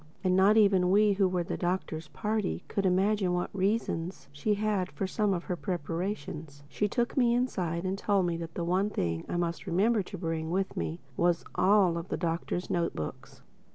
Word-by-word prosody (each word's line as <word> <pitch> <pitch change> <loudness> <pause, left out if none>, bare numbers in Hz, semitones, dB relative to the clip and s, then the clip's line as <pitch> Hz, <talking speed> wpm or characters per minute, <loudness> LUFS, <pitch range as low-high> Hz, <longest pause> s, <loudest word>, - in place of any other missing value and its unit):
And 185 -1 +3
not 195 +3 +5
even 195 -4 +5
we, 205 +2 +5
who 195 -1 +3
were 180 -1 0
of 170 - -6
the - - -2
Doctor's 175 -3 -2
party, 210 +3 -2
could 195 -1 0
imagine 190 0 +2
what 175 0 -2
reasons 190 -4 -1
she 175 +9 0
had 205 -3 0
for 145 +7 -3
some 205 +2 0
of 175 -2 -1
her 180 - -2
preparations. 165 -4 -4
She 210 +7 -1
took 240 +3 -1
me 240 -3 +4
inside 180 -9 -1
and 190 +1 -2
told 200 -3 +2
me 170 -1 0
that 165 -1 -7
the 170 - -2
one 185 +4 +1
thing 85 - -2
I - - -1
must 170 +2 -2
remember 205 +5 +3
to 190 +1 -7
bring 165 -2 -2
with 190 +2 -1
me 80 0 -3
was 175 -1 +1
all 185 -4 +4
of 170 - -8
the - - -1
Doctor's 170 +2 -2
note 170 -1 0
books. 75 - -7
185 Hz, 200 wpm, -29 LUFS, 170-200 Hz, -, not